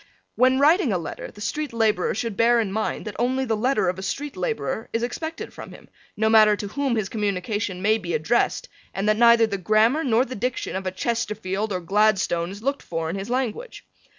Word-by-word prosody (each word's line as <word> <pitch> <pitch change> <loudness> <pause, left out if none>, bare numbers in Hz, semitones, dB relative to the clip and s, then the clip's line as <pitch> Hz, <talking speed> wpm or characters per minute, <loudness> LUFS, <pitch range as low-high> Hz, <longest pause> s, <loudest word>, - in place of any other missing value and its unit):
When 255 +1 +3
writing 300 - +4
a 185 - +1
letter 165 - -6
the 205 - -14
street 300 +6 -3
laborer 220 -6 +1
should 225 0 -3
bear 235 +2 +4
in 215 -4 -1
mind 220 +2 -2
that 210 - -6
only 260 +2 +1
the 225 -3 0
letter 215 -3 +1
of 180 +1 -1
a - - -5
street 280 +9 -4
laborer 370 - -3
is 230 +1 -1
expected 320 +7 -5
from - - -9
him, - - -15 0.3
no 220 +1 +2
matter 215 -1 +6
to 205 0 -6
whom 275 +1 -1
his 215 -4 -1
communication 200 -2 -2
may 215 +2 +3
be 175 -4 -3
addressed 230 +11 0 0.3
and 195 +2 -1
that 215 0 +3
neither 235 0 +6
the 200 -3 -3
grammar 215 - +3
nor 245 -1 +2
the 255 - -7
diction 250 -3 -3
of 190 0 -3
a - - -1
Chesterfield 210 -1 -2
or 185 -2 -2
Gladstone 190 -2 +1
is 200 +3 -9
looked 275 +2 -1
for 165 -1 -3
in - - -4
his 195 +3 -5
language. 260 - -3
220 Hz, 215 wpm, -24 LUFS, 195-245 Hz, 0.3 s, matter